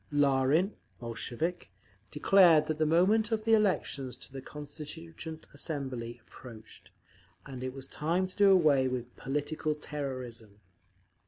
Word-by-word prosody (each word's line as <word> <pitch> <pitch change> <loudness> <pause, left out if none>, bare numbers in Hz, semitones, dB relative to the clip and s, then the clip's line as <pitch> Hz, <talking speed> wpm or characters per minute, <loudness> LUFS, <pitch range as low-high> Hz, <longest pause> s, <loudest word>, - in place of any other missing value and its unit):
_ - - -36
Larin, 145 +6 +3 0.3
Bolshevik, 120 - -4 0.4
declared 165 - +5
that 155 0 -3
the 155 - +3
moment 205 +8 +3
of 220 0 -1
elections 190 - +1
to 130 - -13
the 135 - -6
Constituent 155 +3 -8
Assembly 130 -6 -4
approached, 115 -3 -13 0.6
and 130 -2 -7
it 130 - -3
was 135 0 -9
time 165 +7 0
to 185 - -8
do 200 -1 +5
away 150 -8 +5
with 125 -1 -4
"political 150 +2 -2
terrorism." 130 -8 -6
150 Hz, 130 wpm, -30 LUFS, 130-165 Hz, 0.6 s, declared